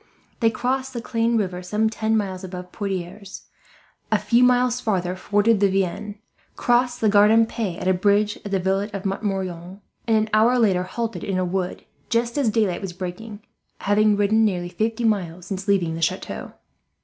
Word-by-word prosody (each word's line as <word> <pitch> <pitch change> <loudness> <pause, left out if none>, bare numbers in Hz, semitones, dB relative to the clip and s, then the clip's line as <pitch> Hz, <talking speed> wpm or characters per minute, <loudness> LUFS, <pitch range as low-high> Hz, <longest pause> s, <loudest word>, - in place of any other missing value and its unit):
They 225 - +4
crossed 260 +4 -2
the 240 - -3
Clain 230 0 0
river 180 -4 -2
some 210 +5 0
ten 220 0 0
miles 190 -3 -3
above 180 -1 -7
Poitiers, 195 -1 -5 0.7
a - - +4
few 240 +1 +3
miles 250 0 +3
farther 185 -6 -1
forded 205 +3 +2
the 200 -1 +4
Vienne, 195 +2 -2 0.4
crossed 245 0 +1
the 220 - +3
Gartempe 210 -2 +3
at - - -3
a 185 - +4
bridge 205 +3 +2
at 205 - -6
the 195 - +1
village 195 +3 0
of 200 -1 -5
Montmorillon 190 -2 -3 0.3
and, 225 -1 +4
an 215 0 0
hour 225 +4 +4
later, 200 -6 +3
halted 230 +4 -4
in 195 -2 -2
a 185 - 0
wood, 180 0 -3 0.2
just 235 0 0
as 280 -6 +2
daylight 210 -5 0
was 190 -3 -5
breaking, 205 +4 -7 0.4
having 205 +1 +3
ridden 210 +2 +3
nearly 180 -4 0
fifty 220 +6 -2
miles 180 -6 -1
since 195 +2 -5
leaving 185 -5 +2
the 165 - -5
chateau. 185 +4 -3
205 Hz, 175 wpm, -23 LUFS, 185-225 Hz, 0.7 s, They